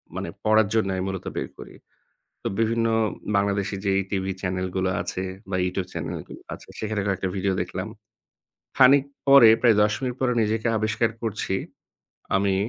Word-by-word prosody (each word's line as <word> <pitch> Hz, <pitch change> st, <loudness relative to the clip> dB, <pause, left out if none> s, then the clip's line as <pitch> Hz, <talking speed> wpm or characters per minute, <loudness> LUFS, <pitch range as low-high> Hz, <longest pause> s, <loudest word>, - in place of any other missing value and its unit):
মানে -, -, -4 dB, 0.2 s
পড়ার 110 Hz, -1 st, +4 dB
জন্য 110 Hz, -3 st, +2 dB
আমি 95 Hz, -, -2 dB
মূলত 95 Hz, -1 st, -5 dB
বের 65 Hz, -, -3 dB
করি। -, -, -10 dB, 0.7 s
তো -, -, -6 dB
বিভিন্ন 115 Hz, +1 st, +1 dB, 0.5 s
বাংলাদেশি 100 Hz, 0 st, 0 dB
যেই 95 Hz, 0 st, +3 dB
টিভি 95 Hz, -1 st, -1 dB
চ্যানেলগুলো 95 Hz, 0 st, -1 dB
আছে, 90 Hz, +1 st, -4 dB, 0.3 s
বা 95 Hz, -, 0 dB
YouTube 90 Hz, 0 st, -3 dB
চ্যানেলগুলো -, -, -6 dB
আছে -, -, -14 dB
সেখানে 110 Hz, -1 st, -2 dB
কয়েকটা 95 Hz, -1 st, -1 dB
video 95 Hz, 0 st, 0 dB
দেখলাম। -, -, -5 dB, 0.9 s
খানিক 135 Hz, +1 st, +7 dB, 0.2 s
পরে 135 Hz, -4 st, +9 dB
প্রায় 115 Hz, -4 st, +5 dB
১০ 105 Hz, 0 st, +3 dB
মিনিট 125 Hz, -2 st, -2 dB
পরে 130 Hz, -2 st, +2 dB
নিজেকে 110 Hz, +1 st, -1 dB
আবিষ্কার 110 Hz, +2 st, +1 dB
করছি 100 Hz, -3 st, -1 dB, 0.8 s
আমি 95 Hz, 0 st, +2 dB
100 Hz, 150 wpm, -24 LUFS, 95-110 Hz, 0.9 s, পরে